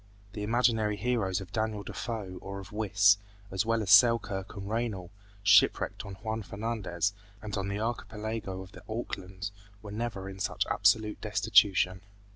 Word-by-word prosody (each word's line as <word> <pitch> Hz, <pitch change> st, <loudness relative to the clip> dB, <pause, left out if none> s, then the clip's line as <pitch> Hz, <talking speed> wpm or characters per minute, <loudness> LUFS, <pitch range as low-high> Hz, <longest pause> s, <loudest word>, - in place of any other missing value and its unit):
The 105 Hz, -, -5 dB
imaginary 110 Hz, -1 st, +2 dB
heroes 100 Hz, -4 st, 0 dB
of 95 Hz, -1 st, -10 dB
Daniel 110 Hz, -1 st, -1 dB
Defoe 100 Hz, -7 st, -5 dB
or 100 Hz, 0 st, -6 dB
of 95 Hz, -, -10 dB
Wyss, 105 Hz, -1 st, +4 dB, 0.3 s
as 95 Hz, +3 st, 0 dB
well 115 Hz, -1 st, +2 dB
as 95 Hz, -, 0 dB
Selkirk 100 Hz, -2 st, +5 dB
and 100 Hz, 0 st, -6 dB
Raynal 105 Hz, -5 st, -2 dB, 0.3 s
shipwrecked 105 Hz, 0 st, +4 dB
on 100 Hz, -, -7 dB
Juan 110 Hz, +3 st, -4 dB
Fernandez 100 Hz, -3 st, -2 dB, 0.3 s
and 105 Hz, -1 st, -5 dB
on 100 Hz, 0 st, -2 dB
the 100 Hz, +1 st, -2 dB
archipelago 110 Hz, -3 st, -4 dB
of 95 Hz, -, -14 dB
the -, -, -12 dB
Aucklands, 95 Hz, -4 st, -5 dB, 0.3 s
were 105 Hz, -, -8 dB
never 110 Hz, -3 st, -4 dB
in 95 Hz, 0 st, -8 dB
such -, -, 0 dB
absolute 110 Hz, -1 st, +2 dB
destitution. 100 Hz, -3 st, +3 dB
105 Hz, 155 wpm, -30 LUFS, 95-110 Hz, 0.3 s, Selkirk